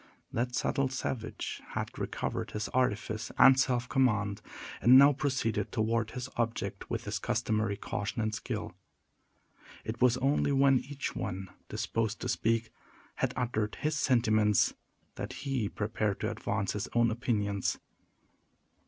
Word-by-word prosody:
That 125 +1 -1
subtle 135 -1 +1
savage 130 -3 -4
had - - -4
recovered - - -3
his 105 +1 -3
artifice 110 -3 -1
and 135 0 +8
self 125 -2 +1
command, 110 -7 +1 0.4
and 125 +2 +8
now 140 +2 +8
proceeded 135 -6 -1
toward 115 -1 0
his 125 +1 -5
object 115 -1 -2
with - - -2
his - - -3
customary 110 -3 0
caution 105 +3 -3
and 110 0 -1
skill. - - -4 1.1
It 115 +2 -5
was 125 -1 +5
only 140 +2 +2
when 135 -1 +5
each 140 +1 -5
one 95 +1 -4 0.2
disposed 110 -1 -1
to - - -2
speak 115 0 0 0.5
had - - +1
uttered 110 -4 -1
his 155 +1 -1
sentiments, 110 -5 +3 0.4
that - - -4
he 130 -7 0
prepared 105 -1 -1
to - - 0
advance 100 -1 -2
his 105 - -3
own 115 -1 +4
opinions. 105 -5 0
115 Hz, 135 wpm, -31 LUFS, 110-130 Hz, 1.1 s, and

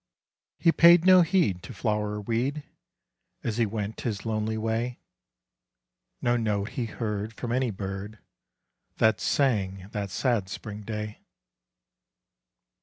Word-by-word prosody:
He 165 - +4
paid 170 +1 +7
no 185 -1 +8
heed 165 - +2
to - - -10
flower 105 -2 -1
or 105 - -4
weed 125 +8 -1 0.8
As 110 -1 -2
he 115 -2 +2
went 105 0 -4
his 105 -3 -3
lonely 110 0 -1
way, 115 +3 -2 1.2
No 120 0 +3
note 105 -3 0
he 125 -2 -3
heard 105 -1 -3
from 120 +1 -4
any 130 0 +1
bird 100 +1 -5 0.8
That 110 0 +3
sang, 100 -8 0
that 100 -2 -3
sad 105 0 0
spring 105 +2 -7
day. 105 0 -5
110 Hz, 125 wpm, -27 LUFS, 105-120 Hz, 1.2 s, no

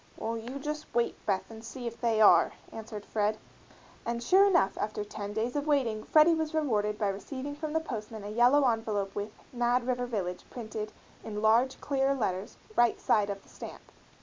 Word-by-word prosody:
"Well, 225 +1 -2
you 235 +4 -6
just 300 +2 -4
wait, 235 0 0
Beth, 190 0 0
and 225 0 -10
see 245 +2 -7
if 235 0 -6
they 230 -2 +2
are," 180 -6 +6 0.2
answered 215 -2 -7
Fred; 215 0 0 0.7
and 235 0 -3
sure 385 +10 +6
enough, 200 - +3
after 210 0 -2
ten 205 -1 -6
days 225 +5 -2
of 290 +1 -1
waiting 240 -8 +1
Freddie 315 +2 +6
was 315 -1 -1
rewarded 210 -9 +1
by 210 -2 +1
receiving 260 +8 -5
from 300 +1 -5
the 320 - +3
postman 220 -7 -6
a 205 - -5
yellow 250 +5 +5
envelope 215 -4 -1
with 205 +1 -3 0.2
"Mad 240 0 +1
River 245 -1 -1
Village" 185 -6 -3
printed 220 -3 -5 0.3
in 210 -1 -5
large, 235 +4 +4
clear 275 -1 +1
letters 195 -5 -2 0.2
"right 240 -1 +3
side 205 -2 +2
of 200 -1 -5
the - - -21
stamp." - - -10
230 Hz, 190 wpm, -30 LUFS, 210-265 Hz, 0.7 s, are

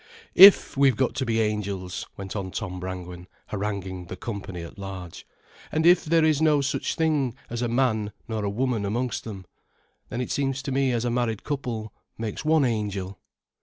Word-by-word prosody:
"If 195 +1 +9
we've 135 -3 +4
got 130 +1 +1
to 130 - -1
be 115 -1 +2
Angels," 100 -4 -2
went 95 0 -6
on 95 -2 -3
Tom 90 0 -5
Brangwen, 90 -1 -7 0.2
haranguing 95 -3 -3
the 90 - -6
company 95 -4 -6
at 85 - -11
large, 95 -3 -8 0.4
"and 160 +1 +1
if 175 +1 +6
there 165 0 +4
is 155 -1 +2
no 155 -2 +4
such 140 0 -1
thing 150 -7 +1 0.2
as 120 0 -3
a 120 - +1
man 115 -4 +1 0.2
nor 110 -2 -3
a 100 - 0
woman 120 0 -1
amongst 120 +5 -2
them, 100 -4 -7 0.6
then 120 - -4
it 125 - -3
seems 135 -1 -1
to 135 - -3
me 135 0 +2
as 120 0 0
a 120 - 0
married 120 -3 -1
couple 120 -7 -4 0.2
makes 110 +3 -4
one 155 -2 +4
Angel." 100 -5 -2
115 Hz, 185 wpm, -25 LUFS, 100-135 Hz, 0.6 s, If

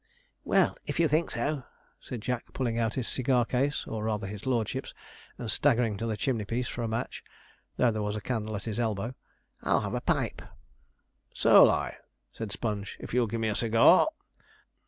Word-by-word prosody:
'Well, - - +2
if - - -2
you 165 - +5
think 155 +3 +1
so,' 145 -2 -2 0.4
said 120 - -7
Jack, 125 +1 -3
pulling 120 -3 -1
out 115 -2 0
his 125 -3 -2
cigar 125 -2 +1
case, 135 +5 0
or 110 -1 -4
rather 105 -2 -1
his 105 +4 -7
lordship's, 120 -5 -1 0.4
and 115 -3 -1
staggering 120 -6 +3
to 115 - -3
the 110 -2 -2
chimney 120 -4 0
piece 120 +4 -2
for 120 - -5
a 115 - -1
match, 115 +2 -4 0.5
though 120 - +4
there 110 -1 -2
was 105 0 -2
a - - -2
candle 110 0 -3
at 100 - -5
his 110 0 -3
elbow, 110 0 -1 0.5
'I'll - - +2
have - - -4
a - - -1
pipe.' - - 0 0.9
'So'll - - +7
I,' - - -1 0.3
said 110 -3 -6
Sponge, 105 -2 -3
'if - - -8
you'll 125 -1 +3
give 115 +2 -3
me 110 - +1
a 105 - -1
cigar.' 115 - +5
115 Hz, 190 wpm, -29 LUFS, 110-125 Hz, 0.9 s, So'll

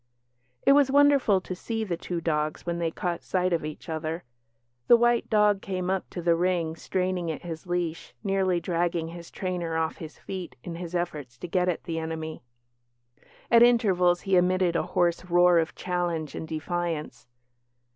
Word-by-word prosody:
It - - +7
was 280 -1 +5
wonderful 280 -7 +5
to 185 - -6
see 225 +4 -3
the 185 -5 -2
two 170 0 -4
dogs 155 -2 -1
when 170 0 -2
they 165 -1 0
caught 170 +1 -3
sight 185 -1 0
of 165 - 0
each 155 +3 -7
other. 160 +1 -3 0.6
The 240 - +8
white 240 0 +2
dog 210 -2 +3
came 185 -1 -2
up 190 -1 -2
to 175 - -6
the 170 0 +4
ring 170 -2 0
straining 180 0 -2
at 160 - -4
his 165 0 -7
leash, 175 -2 -3
nearly 190 -3 +1
dragging 170 -1 -1
his 170 0 -9
trainer 175 -3 -3
off 160 0 -1
his 155 -2 -9
feet 185 -2 -7
in 175 - -6
his 170 +1 -6
efforts 150 -8 -3
to 180 - -7
get 180 +1 +1
at 175 - -2
the 165 -1 -3
enemy. 160 -1 -5 1.1
At 235 0 +7
intervals 190 -7 +4
he 195 -1 +1
emitted 180 -1 +2
a - - +3 0.2
hoarse 175 +1 +2
roar 175 -1 +5
of 165 0 -2
challenge 175 -4 -2
and 160 - -6
defiance. 160 -2 -3
175 Hz, 175 wpm, -27 LUFS, 165-185 Hz, 1.1 s, The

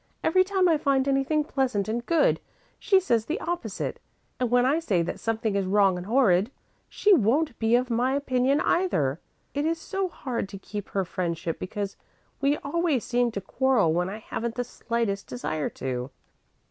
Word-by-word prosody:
Every 370 +3 +4
time 380 -1 +2
I 320 -3 +3
find 275 -2 +2
anything 275 +3 +2
pleasant 255 -9 -1
and 235 +2 -2
good, 325 +2 +2 0.4
she 390 -2 +4
says 235 - +1
the 335 +8 -2
opposite, 340 - -3 0.4
and 250 -2 0
when 245 +1 +4
I 285 +5 +3
say 195 - +1
that - - -4
something 220 -2 -1
is 195 -2 0
wrong 195 -1 +4
and 180 +1 -6
horrid, 215 -5 +3 0.4
she 415 - +3
won't 270 - +2
be 225 +1 +3
of 250 0 +1
my 250 +3 +1
opinion 270 0 +1
either. 160 - +1 0.3
It 285 - -1
is 325 +1 0
so 385 +2 -2
hard 240 - -4
to 200 - -7
keep 205 +1 -7
her 195 -1 -1
friendship 170 -2 -3
because 200 +1 -4 0.4
we 280 +2 +2
always 295 -3 0
seem 245 0 +1
to 200 - -3
quarrel 235 -5 +2
when 180 +2 0
I 205 - -5
haven't 225 +1 -4
the 245 - -1
slightest 230 -4 -3
desire 155 - -3
to." 125 -1 -4
245 Hz, 180 wpm, -26 LUFS, 200-285 Hz, 0.4 s, Every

